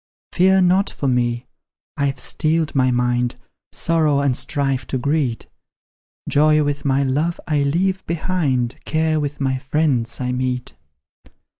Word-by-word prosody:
Fear 190 +1 +4
not 185 +3 +3
for 140 - -4
me 120 -1 0 0.5
I've 140 -2 -1
steeled 160 0 0
my 130 -2 +3
mind 125 0 0 0.4
Sorrow 155 -4 +1
and 140 -3 +1
strife 135 -4 -2
to 130 - -2
greet; 140 -2 -1 0.8
Joy 150 +1 +4
with 145 0 -2
my 140 0 +2
love 150 +6 0
I 150 -2 +1
leave 185 +7 0
behind, 155 -8 -1
Care 155 0 0
with 145 -1 -3
my 130 -1 0
friends 135 -4 0
I 125 -1 -2
meet. 125 0 -2
140 Hz, 135 wpm, -20 LUFS, 130-160 Hz, 0.8 s, Fear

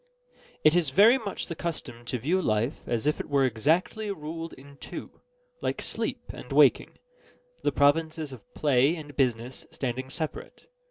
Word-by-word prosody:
It 155 +2 +6
is 170 -5 +3
very 215 - +6
much 205 -5 -4
the 170 - -5
custom 155 -8 -5
to 125 - -2
view 165 +11 +1
life 110 +1 0
as 120 0 -1
if 150 - +1
it - - -5
were 140 -2 +3
exactly 160 - +1
ruled 165 -2 -5
in 140 +1 -14
two, - - -9 0.4
like - - -1
sleep - - -3
and - - -10
waking; - - +4 0.6
the - - +1
provinces 155 0 +2
of 120 -6 -14
play 145 +1 +3
and 145 -4 -9
business 125 -2 -1
standing 130 0 -4
separate. 155 +3 -6
145 Hz, 160 wpm, -27 LUFS, 130-165 Hz, 0.6 s, It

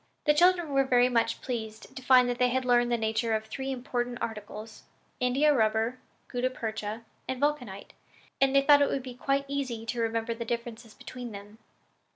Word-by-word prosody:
The 300 - +5
children 350 0 +4
were 275 0 +4
very 250 -1 +4
much 235 -2 0
pleased 220 -3 -6
to - - -7
find 255 -1 +5
that 245 0 -2
they 250 0 +4
had 260 +1 -1
learned 240 -1 +3
the 235 - +2
nature 220 0 0
of 220 0 -3
three 265 +5 -5
important 245 -1 -3
articles 215 0 -7 0.4
India 270 +4 +3
rubber, 225 +1 +1 0.3
gutta 250 +1 -1
percha 220 -2 -5 0.2
and 260 -1 -3
vulcanite 255 -9 -2 0.5
and 270 0 +3
they 275 - +5
thought 285 0 +6
it 285 - +3
would 270 - -2
be 255 -1 -7
quite 275 +3 -1
easy 260 -5 -3
to 230 +1 -2
remember 230 0 -1
the 230 +1 -5
differences 230 -1 -5
between 245 -3 -8
them. 205 +2 -11
245 Hz, 190 wpm, -28 LUFS, 225-265 Hz, 0.5 s, thought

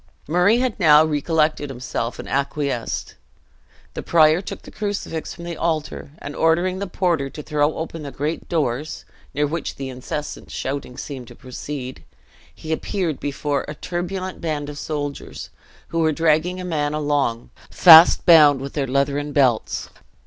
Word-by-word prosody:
Murray 180 +8 +3
had 250 -4 -1
now 155 -3 +6
recollected 155 -1 0
himself, 120 -2 -4
and - - -8
acquiesced. 140 -3 -2 0.8
The - - -5
prior 160 +1 +4
took - - -8
the - - -12
crucifix 200 -6 -4
from 170 - -10
the 170 -1 -5
altar, 155 -3 -3
and 145 -2 -8
ordering 175 +3 +1
the 200 - -3
porter 170 -6 0
to 150 - -9
throw 150 0 0
open 165 0 -5
the 145 - -6
great 145 +4 -4
doors 150 -2 -2 0.3
(near 145 +1 +2
which 155 +1 -4
the 135 -1 -6
incessant 130 +4 -6
shouting 135 -2 -5
seemed 130 -4 -7
to - - -13
proceed), 130 0 -7 0.5
he 155 - -8
appeared 165 -1 -2
before 145 0 -2
a 150 - -6
turbulent 180 +3 -4
band 150 -3 -3
of 145 -1 -7
soldiers, 145 -2 -5 0.4
who 165 - -2
were 160 -1 +3
dragging 165 +3 +1
a 180 - -5
man 150 -4 -1
along, 145 -6 -1 0.2
fast 165 -1 +8
bound 150 -5 +7
with 135 +1 -6
their 140 -3 -1
leathern 140 +2 0
belts. 130 -6 +1
150 Hz, 155 wpm, -22 LUFS, 140-165 Hz, 0.8 s, fast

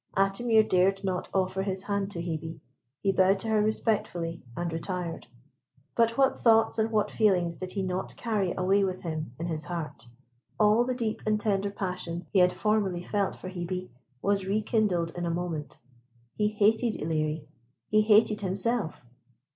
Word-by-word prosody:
Atimir 215 +3 +3
dared 195 +2 +2
not 185 -2 -2
offer 190 0 0
his 190 -1 -3
hand 200 -1 -1
to 175 -4 -5
Hebe. 160 -1 -4 0.4
He 195 - +3
bowed 190 +1 +3
to 225 - -4
her 215 -1 +3
respectfully, 200 -6 -1 0.2
and 170 -1 -2
retired. 170 -2 -4 0.7
But 230 0 +2
what 270 -1 +3
thoughts 225 -1 +4
and 220 +1 +2
what 215 -2 +1
feelings 180 -6 +2
did 185 +3 -7
he 195 - -1
not 185 0 -3
carry 210 -6 0
away 195 +2 +3
with 185 -1 -2
him 155 -6 -4
in 165 - -4
his 160 -2 -3
heart! 155 -8 -6 0.5
All 215 +3 +5
the 255 0 -1
deep 225 -3 -2
and 215 0 +2
tender 200 -1 0
passion 180 -3 -4
he 195 - +3
had 180 0 +5
formerly 200 -5 0
felt 200 +1 -1
for - - -9
Hebe 185 0 -4 0.3
was 200 -1 +1
rekindled 205 -5 +1
in 175 -1 -2
a - - 0
moment. 165 -5 -4 0.6
He 210 - +1
hated 215 +2 +2
Ilerie; 155 -1 -1 0.4
he 215 0 +4
hated 215 0 +4
himself. 195 - +1
190 Hz, 165 wpm, -28 LUFS, 175-215 Hz, 0.7 s, All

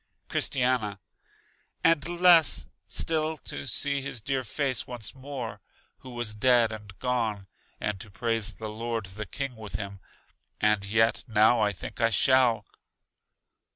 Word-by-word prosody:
Christiana: 125 -6 0 0.8
And 165 -1 +3
less 175 -3 +5 0.2
still 160 -1 0
to 145 - -6
see 140 +3 +1
his 130 -3 -5
dear 130 +4 -2
face 130 +2 -1
once 120 -3 -5
more 135 -3 -7 0.4
who 130 - -12
was 120 -3 -3
dead 120 +1 +3
and 105 -3 -9
gone, 115 -6 -1 0.3
and 105 -2 -2
to 105 +1 -9
praise 110 +1 -2
the 110 - -6
Lord 115 0 -3
the 100 +2 -7
King 135 +4 -4
with 110 -3 -8
him; 100 -1 -5 0.6
and 105 -1 +3
yet 110 +3 +2
now 110 +2 +4
I 105 -1 +2
think 95 - -7
I 115 - +4
shall. 115 -1 +3
115 Hz, 140 wpm, -27 LUFS, 105-130 Hz, 0.8 s, less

